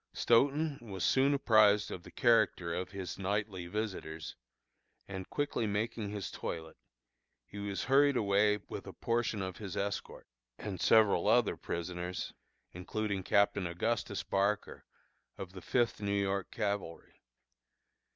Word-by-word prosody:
Stoughton 140 +5 +2
was 100 -5 -6
soon 135 +1 +4
apprised 110 -6 +4
of 90 - -5
the - - -13
character 110 -7 +2
of 90 - -3
his 95 -2 -6
nightly 100 -2 -2
visitors, 90 -6 -4 0.7
and 95 -1 -6
quickly 145 -6 -1
making 105 +1 -2
his 100 -2 -5
toilet, 80 -1 -5 0.7
he 100 - -9
was 100 -1 -3
hurried 140 +1 +4
away 105 0 +3
with - - -7
a - - -7
portion 115 -3 -1
of 95 -1 -5
his 100 -4 -6
escort, 100 0 -3 0.3
and 95 -4 -5
several 110 -2 +5
other 120 0 +4
prisoners, 90 +1 -4 0.4
including 100 +2 -3
Captain 100 0 +2
Augustus 100 +3 -2
Barker, 100 +1 -1 0.5
of 95 -2 -7
the 95 - -9
Fifth 120 +3 0
New 100 0 0
York 100 -1 -1
Cavalry. 100 -5 -4
100 Hz, 130 wpm, -33 LUFS, 95-110 Hz, 0.7 s, several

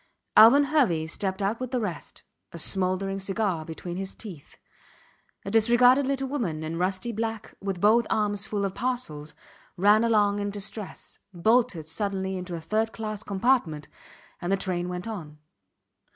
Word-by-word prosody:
Alvan 240 +7 +8
Hervey 260 - +2
stepped 190 +4 -2
out 210 +4 0
with 255 -1 -4
the 255 -1 -1
rest, 205 -7 -6 0.3
a - - -8
smouldering 190 +3 0
cigar 195 -3 -1
between 175 +2 -6
his 195 0 -4
teeth. 180 -10 -10 0.9
A 195 - -4
disregarded 245 +4 +5
little 270 -1 -1
woman 205 - -2
in 165 +2 -4
rusty 190 +5 -1
black, 225 0 -4
with 195 -2 -3
both 220 +4 +4
arms 205 -1 0
full 205 -2 -1
of 195 - -3
parcels, 240 -14 -3 0.4
ran 205 +4 +5
along 205 -3 +3
in 205 0 -2
distress, 205 0 -7 0.2
bolted 215 -3 +2
suddenly 190 +2 -2
into 180 -1 -5
a - - -4
third 220 +6 0
class 215 -2 -5
compartment 195 - 0 0.5
and 175 - -2
the 195 - +3
train 180 -2 -2
went 180 +3 -5
on. 165 -9 -7
200 Hz, 155 wpm, -26 LUFS, 180-225 Hz, 0.9 s, Alvan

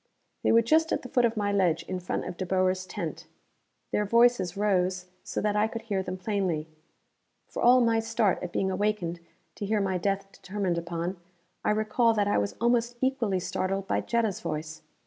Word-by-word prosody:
They - - +2
were 230 0 +6
just 320 +7 +3
at - - 0
the 250 - -8
foot 245 -1 +3
of 230 -1 0
my 205 -1 +1
ledge, 185 -5 +2
in 185 - -4
front 180 - -3
of - - -5
De 185 - -3
Boer's 185 0 +1
tent. 175 -4 -5 0.6
Their 210 - +1
voices 220 -4 +3
rose 185 -3 +1 0.2
so - - -3
that 210 0 0
I 210 +1 +3
could 225 0 -6
hear 200 -4 -1
them 185 0 -5
plainly. 185 -6 -1 0.8
For - - -6
all 250 +1 +6
my 230 -1 +3
start 225 -3 +1
at 180 - -5
being 190 +1 0
awakened 185 -3 -1 0.3
to 205 - -5
hear 215 0 +1
my 190 -2 0
death 195 +2 0
determined 190 -4 -2
upon, 170 +2 -4 0.5
I - - +1
recall 215 +2 +2
that 205 -1 +2
I 205 - +2
was 100 0 -2
almost 235 0 +1
equally 240 -8 +1
startled 190 +2 -2
by - - +1
Jetta's 225 -5 0
voice. 155 0 -4
200 Hz, 195 wpm, -28 LUFS, 185-225 Hz, 0.8 s, were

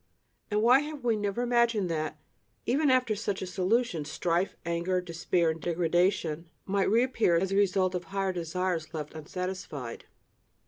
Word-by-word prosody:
And 210 0 +1
why 250 +3 +7
have 295 -2 -6
we 235 -2 +2
never 205 +3 -1
imagined 235 -5 +2
that, 155 -1 -2 0.5
even 280 +4 +2
after 255 -4 +3
such 205 -2 -2
a - - -2
solution, 185 -1 0
strife, 170 +5 -1
anger, 170 +2 0
despair, 170 -1 0
and 160 0 -7
degradation 170 -1 +1 0.2
might 195 0 +1
reappear 230 -4 +3
as 190 +3 0
a - - +1
result 190 -2 +2
of 180 -1 -3
higher 195 +1 -1
desires 170 -1 -2
left 150 -1 -5
unsatisfied? 160 -6 -5
185 Hz, 150 wpm, -29 LUFS, 170-215 Hz, 0.5 s, why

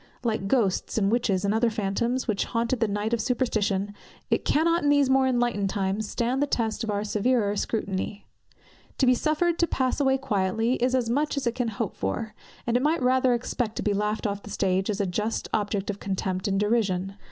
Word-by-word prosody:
Like 220 -5 -1
ghosts 205 -5 +1
and 200 -2 +2
witches 205 -5 +1
and 200 - +2
other 230 +2 +3
phantoms, 230 +4 -1
which 215 -3 0
haunted 235 +1 -1
the 225 - +2
night 205 +2 -2
of 235 - +1
superstition, 205 -5 0 0.4
it - - +2
cannot 335 +3 +2
in 290 - +2
these 285 -2 +4
more 265 0 +4
enlightened 240 -6 +1
times 200 +1 -1
stand 245 +3 0
the 290 - +2
test 230 -4 -1
of 225 - -3
our 205 0 -1
severer 215 0 +1
scrutiny. 205 -1 -3 0.7
To 265 - +3
be 255 - +6
suffered 315 +6 +1
to 340 - +3
pass 260 -2 0
away 265 -1 +3
quietly, 225 -2 0
is 255 +2 +1
as 250 -3 +1
much 290 +5 0
as 280 - -1
it 235 - +1
can 245 -1 -1
hope 220 -1 -3
for; 215 - -3 0.3
and 235 - 0
it 250 - +3
might 300 0 +1
rather 255 0 +3
expect 235 -1 -2
to - - -3
be 205 - +1
laughed 210 +3 -1
off 200 -1 -2
the 205 - -11
stage 190 -1 0
as 205 -1 -1
a 200 - +1
just 210 +5 -2
object 205 -1 -1
of 200 - -9
contempt 190 -1 -2
and 195 -1 +1
derision. 200 -3 0
225 Hz, 210 wpm, -26 LUFS, 200-255 Hz, 0.7 s, be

